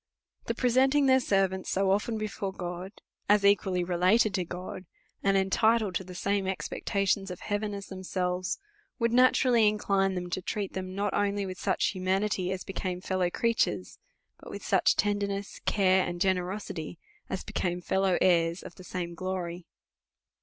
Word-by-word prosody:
The - - -2
presenting 265 +3 +3
their 260 0 +5
servants 195 -5 0
so 195 0 +2
often 210 +3 0
before 210 -2 -3
God, 180 0 -6 0.4
as 205 -1 +5
equally 190 -3 +3
related 185 +5 +3
to 185 -1 0
God, 180 +2 -7 0.3
and 195 0 +3
enti 220 +4 +3
tled 205 -4 -3
to 190 - -2
the 180 0 -10
same 200 +1 0
expectations 195 +1 -1
of 180 - -7
heaven 205 0 -2
as 200 0 -6
themselves, 185 -1 -2 0.4
would 235 -1 +1
naturally 250 -2 +5
incline 195 -2 +1
them 180 0 -3
to 185 - -2
treat 200 +1 -3
them, 185 0 -5
not 200 0 -1
only 205 0 0
with 185 -1 -6
such 190 - +1
humanity 190 0 0
as 185 -1 -3
became 185 -2 -4
fellow 185 -1 0
creatures, 225 - 0 0.4
but - - -12
with - - -8
such - - +3
tenderness, 200 -1 -1
care, 190 -2 +3
and 175 0 -4
generosity, 185 -3 -2 0.3
as 190 - -3
became 175 -1 -2
fellow 190 +1 +1
heirs 170 -1 +3
of - - -9
the 185 - -11
same 175 -1 -4
glory. 180 -1 -4
190 Hz, 160 wpm, -29 LUFS, 180-205 Hz, 0.4 s, their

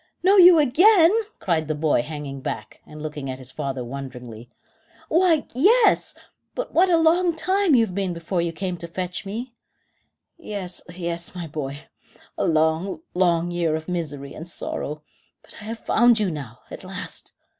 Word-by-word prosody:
"Know 385 +2 +5
you 360 -2 +9
again!" 330 - +6 0.3
cried 160 -4 -1
the 155 - -1
boy, 150 -4 +2
hanging 145 -2 -7
back, 110 -4 -6
and 150 0 -10
looking 150 -3 -5
at 130 - -4
his 130 -1 -11
father 135 -2 -4
wonderingly. 125 -3 -8 0.6
"Why, 330 -2 +3
yes; 430 - +3 0.4
but - - -4
what 365 +2 +4
a 340 - +5
long 335 +1 +3
time 375 -1 +2
you 230 -2 +5
have 190 - -9
been 195 -1 -1
before 170 +1 -2
you 170 0 -1
came 180 +1 -4
to 170 - -8
fetch 180 +2 -5
me." 235 +5 -5 0.9
"Yes, 195 - -6
yes, 170 0 -5
my 175 -2 -5
boy; 145 -2 -6 0.5
a - - -1
long, 160 - +1
long 175 -1 +2
year 170 -3 0
of 160 0 -6
misery 150 -6 -4
and 165 +2 -8
sorrow; 150 -2 -4 0.4
but - - -12
I - - -10
have 225 +1 -7
found 240 -1 +4
you 200 -4 0
now, 125 -8 -8
at - - -8
last." - - -7
175 Hz, 170 wpm, -23 LUFS, 150-245 Hz, 0.9 s, you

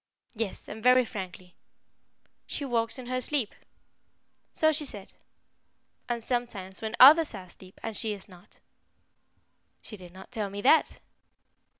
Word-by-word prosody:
"Yes, 225 -4 -4
and 220 - -8
very 250 +1 +5
frankly." 185 -4 -8 0.9
"She 285 - -3
walks 230 -2 -1
in 255 - -8
her 255 +1 -2
sleep." 260 -5 -1 1.0
"So 315 0 +3
she 305 0 -1
said." 205 -8 -7 1.0
"And 235 -1 -2
sometimes 230 -7 -3
when 220 +1 -3
others 295 0 +8
are 190 - -7
asleep, 185 +1 -15
and 225 -1 -4
she 220 -1 -2
is 200 -2 -8
not." 180 -3 -17 1.2
"She 215 - -9
did 180 -2 -12
not 190 +1 -13
tell 210 -3 -3
me 200 +1 -6
that." 300 +5 +4
225 Hz, 140 wpm, -28 LUFS, 190-255 Hz, 1.2 s, others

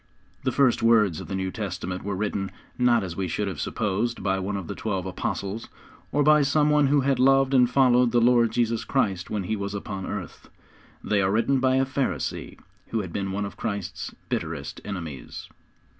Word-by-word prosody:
The 130 - +1
first 130 -1 +3
words 110 -8 +4
of - - -9
the 95 - -3
New 95 0 -2
Testament 95 -3 -4
were 100 0 -2
written, 100 -1 -2 0.3
not 120 -3 +3
as 90 -3 -5
we 95 0 -2
should 100 +5 -2
have 95 -6 -4
supposed 110 +3 -1
by 95 -1 +1
one 100 +1 -2
of 95 - -5
the - - -5
twelve 95 -4 -3
apostles, 100 +3 -4 0.4
or 145 +1 +2
by 150 +1 +6
some 150 +2 +3
one 150 -1 +4
who 145 +1 +3
had 135 -1 +1
loved 135 +1 +4
and 125 -2 +5
followed 125 -2 +4
the 120 - +4
Lord 120 -1 +4
Jesus 115 -1 0
Christ 100 -8 0
when 105 -2 -2
He 110 +4 -1
was 100 0 -4
upon 95 -1 -5
earth. 100 -4 -7 0.5
They 105 -2 +1
are 95 0 +2
written 115 +6 +2
by 130 0 +3
a 135 0 +3
Pharisee 130 - -3 0.3
who 115 - -1
had 95 -4 -7
been 95 -1 -2
one 100 +1 -2
of 100 - -8
Christ's 100 -4 -4
bitterest - - -4
enemies. 85 -9 -7
105 Hz, 200 wpm, -25 LUFS, 95-125 Hz, 0.5 s, by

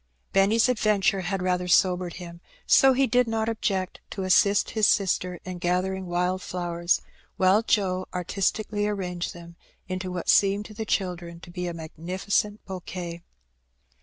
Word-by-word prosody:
Benny^s 205 +5 +4
adventure 210 -5 +2
had 185 +1 -2
rather 180 0 0
sobered 180 0 +3
him, 170 -1 -10 0.2
so 270 0 +6
he 270 +1 +3
did 250 0 +2
not 225 -1 -1
object 195 -5 -2
to 195 - -5
assist 200 +2 +3
his 215 -2 +3
sister 180 -3 +1
in 185 -1 -6
gathering 185 +1 -1
wild 180 +2 0
flowers, 175 -1 -1 0.4
while 190 +3 +4
Joe 185 -5 0
artistically 205 +3 -1
arranged 180 -5 -3
them 170 0 -12 0.3
into 185 0 -4
what 180 -1 -5
seemed 200 +1 +4
to 215 - -10
the 220 +1 -5
children 175 -4 -2
to 175 - -12
be 180 0 -4
a 175 - -3
magnificent 185 +6 -2
bouquet. 180 -2 -6
185 Hz, 150 wpm, -26 LUFS, 180-205 Hz, 0.4 s, so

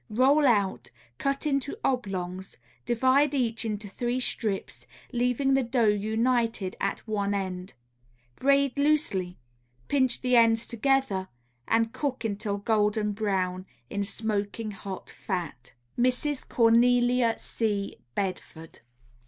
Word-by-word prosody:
Roll 270 +6 +4
out, 205 -5 +1 0.3
cut 275 +2 -1
into 280 +3 -1
oblongs; 190 -7 -2 0.3
divide 260 +4 +3
each 235 -4 0
into 210 -1 -3
three 240 +5 -2
strips, 215 -5 -3 0.2
leaving 250 +2 +1
the 270 - +4
dough 240 -1 0
united 220 0 +1
at 200 +3 -2
one 205 -2 -1
end. 185 -1 -4 0.6
Braid 280 0 +2
loosely, 280 -12 +1 0.5
pinch 260 -4 +2
the 250 -1 +2
ends 230 -1 +4
together 235 -6 0 0.4
and 225 0 +2
cook 265 -5 -3
until 205 -1 -2
golden 210 0 +1
brown 190 -3 -1 0.2
in 200 - -1
smoking 210 +1 -3
hot 195 -1 -8
fat. 175 - -5 0.3
_Mrs. 255 +3 0
Cornelia 240 0 +4
C. 205 -3 -2 0.2
Bedford. 175 -4 -5
225 Hz, 110 wpm, -27 LUFS, 200-255 Hz, 0.6 s, Roll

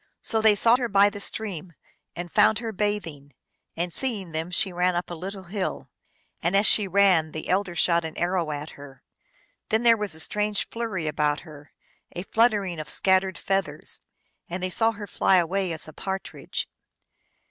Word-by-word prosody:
So 220 -1 +3
they 215 -1 +5
sought 230 +4 +5
her 245 - -1
by 200 0 +5
the 205 - -8
stream, 185 -5 -2 0.4
and 175 -1 -6
found 210 0 +4
her 225 0 -4
bathing, 180 -9 -3 0.4
and, 170 0 -1
seeing 210 -10 0
them, 160 +2 -3
she 185 +1 +3
ran 180 0 +1
up 175 0 -3
a - - -3
lit 185 +4 -6
tle 195 -2 -9
hill. 185 +2 -4 0.5
And, 175 +4 +2
as 200 - +3
she 210 -2 +4
ran, 185 -5 +3
the 155 - -6
elder 185 -1 0
shot 170 -1 +2
an 160 -1 -6
arrow 175 -2 0
at 150 +1 -5
her. 140 -2 -13 0.7
Then 220 +2 +1
there 230 -1 +6
was 210 -6 -4
a - - -9
strange 210 +4 -1
flurry 225 -8 -3
about 150 -1 0
her, 150 -2 -14 0.4
a 175 - -4
fluttering 205 -6 +1
of 155 - -6
scattered 190 -1 +1
feathers, 195 0 -3 0.5
and 180 +2 -4
they 185 - -1
saw 225 +4 +2
her 205 -1 -7
fly 195 - +2
away 185 +1 +1
as 160 -1 -2
a 155 - -11
partridge. 190 +3 -5
190 Hz, 185 wpm, -25 LUFS, 170-205 Hz, 0.7 s, there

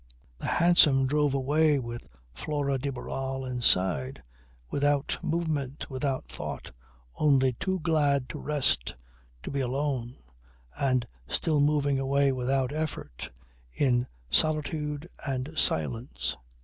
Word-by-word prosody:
The - - -4
hansom 170 -6 +5
drove 145 0 +2
away 145 +3 +3
with 120 -2 -6 0.3
Flora 140 - -1
de 140 +2 -2
Barral 135 +1 -4
inside, 90 - +1 0.5
without 145 0 +1
movement, 155 -5 -2
without 130 0 -1
thought, - - -6 0.5
only 135 -4 +4
too 190 +9 -2
glad 145 -5 +2
to - - -6
rest, 145 - 0 0.5
to - - -5
be 140 - -1
alone 130 -1 -1 0.6
and 130 -3 +1 0.2
still 155 -3 +1
moving 145 -1 +2
away 140 +1 +2
without 130 +1 0
effort, 155 - -4 0.4
in 125 - +2 0.2
solitude 150 0 +1 0.2
and 135 +2 -2
silence. 115 - -1
140 Hz, 110 wpm, -28 LUFS, 130-150 Hz, 0.6 s, hansom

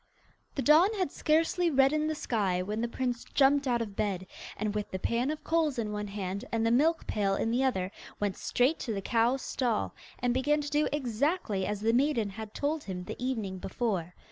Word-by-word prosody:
The 275 - -1
dawn 320 +7 +6
had 370 -8 -1
scarcely 330 +3 +2
reddened 300 +2 +3
the 310 - -1
sky 195 -10 0
when 210 +4 -3
the 235 - 0
prince 245 0 -2
jumped 280 0 +4
out 240 -2 +2
of 205 -3 -9
bed, 195 -3 -1 0.3
and, 210 0 -1
with 210 -1 -3
the 190 - -3
pan 235 +7 0
of 310 0 -4
coals 320 -4 +1
in 215 -3 -2
one 210 0 -3
hand 195 0 -4
and 225 -1 +1
the 230 - +3
milk 310 +7 +3
pail 200 -2 0
in 225 - 0
the 250 +3 +2
other, 190 -8 0 0.3
went 205 -2 0
straight 260 +6 +1
to 230 - -3
the 195 - -2
cow's 240 +4 +2
stall, 240 -5 -1 0.2
and 245 -1 0
began 290 +4 +2
to 290 - -5
do 300 +1 +2
exactly 255 - 0
as 205 0 -3
the 225 +1 +2
maiden 245 -5 +2
had 215 +1 -8
told 295 +1 -1
him 180 -2 -5
the 240 - -7
evening 215 -8 -2
before. 185 -5 -2
235 Hz, 210 wpm, -30 LUFS, 205-285 Hz, 0.3 s, dawn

